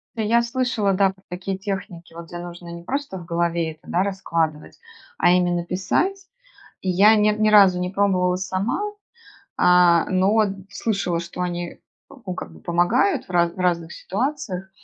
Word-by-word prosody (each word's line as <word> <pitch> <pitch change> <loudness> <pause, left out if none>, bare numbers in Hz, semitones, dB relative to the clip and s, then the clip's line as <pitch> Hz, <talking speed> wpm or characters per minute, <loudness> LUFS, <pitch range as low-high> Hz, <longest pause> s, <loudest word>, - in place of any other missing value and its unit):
Я 225 +1 +2
слышала, 235 -4 0
да, 195 0 +3
про 190 0 -27
такие 185 +2 -4
техники, 190 -4 -6
вот 170 0 -9
где 175 - -8
нужно 175 0 -9
не 170 0 -8
просто 275 -1 -4
в 175 - -9
голове 170 -1 -1
это, 155 - -24
да, 180 - +2
раскладывать, 165 -6 -2 0.4
а - - +4
именно 175 -1 +2
писать. 360 - -1 0.6
И 190 - -4
я 205 +5 +6
ни 210 0 +4
ни 215 0 +1
разу 195 -4 +6
не 180 0 -2
пробовала 185 -2 +1
сама, 190 - -2 0.8
а, 180 -1 +5
но 195 +4 +3 0.3
слышала, 195 -5 -1
что 170 +1 -6
они, 175 -1 -4 0.3
ну, 230 -10 -8
как 80 - -7
бы 80 - -15
помогают 175 +3 +1
в 185 - -11
ра 175 -1 +3
в 170 - -17
разных 170 -2 0
ситуациях 195 -4 -3
185 Hz, 165 wpm, -22 LUFS, 175-200 Hz, 0.8 s, я